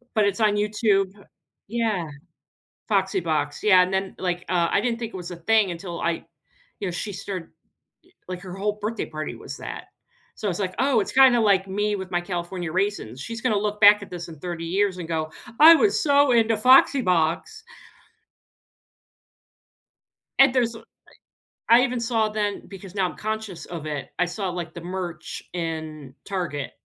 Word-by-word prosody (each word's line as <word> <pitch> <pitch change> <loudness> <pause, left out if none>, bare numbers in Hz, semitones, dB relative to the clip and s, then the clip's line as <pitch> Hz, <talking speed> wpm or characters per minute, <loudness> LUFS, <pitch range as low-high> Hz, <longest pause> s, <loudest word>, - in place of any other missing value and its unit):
But 215 -2 +4
it's 200 +2 0
on 210 -2 +3
YouTube 205 -2 +1 0.6
yeah. 215 -6 -1 0.8
Foxy 195 -2 +1
Box, 150 -3 -2
yeah, 190 -4 +6
and 185 +1 -1
then, 190 0 -2
like, 180 -1 -2
uh, 175 -2 +2
I - - +2
didn't 235 0 -1
think 230 -3 -6
it - - -4
was 180 -1 -7
a 175 - -6
thing 210 +3 +2
until 170 0 -6
I 170 -1 -1 0.6
you 195 - -2
know, - - -2
she 195 +4 -4
started 185 -2 -6 0.8
like, 180 -1 -6
her 185 -1 -8
whole 205 +2 -2
birthday 220 +2 -2
party 155 0 -6
was - - -9
that. - - -7 0.5
So 210 - -4
I - - +2
was 175 - -3
like, 185 -2 -2
"Oh, 265 -5 +3
it's 205 +1 -4
kinda 260 -2 +6
like 200 -3 +3
me 205 +2 -1
with 190 -2 -6
my 175 - 0
California 175 -1 -4
raisins." 185 - -2
She's 230 +8 -6
gonna 240 -5 +1
look 210 0 -2
back 205 0 +8
at 200 - -9
this 175 -1 -7
in 160 -3 -11
30 170 0 -5
years 190 +2 0
and 170 -2 -6
go, 155 -1 -2 0.3
"I 325 +2 +10
was 420 +4 +2
so 285 -3 +4
into 225 -2 +3
Foxy 260 +4 +6
Box." 180 - 0 2.8
And 270 -1 +7
there's 240 -3 +1
I - - -10 0.9
I 235 +2 +8
even 250 -1 -1
saw 225 -2 +1
then 210 -1 -2
because 195 -1 -11
now 195 -2 +1
I'm - - -10
conscious 215 -4 -5
of 165 -3 -7
it, 150 -3 -4
I 180 - +3
saw 190 +2 -4
like 175 -2 -5
the 170 - -7
merch 175 -2 -6
in 155 -5 -5
Target. 170 -8 -3
195 Hz, 185 wpm, -24 LUFS, 175-220 Hz, 2.8 s, I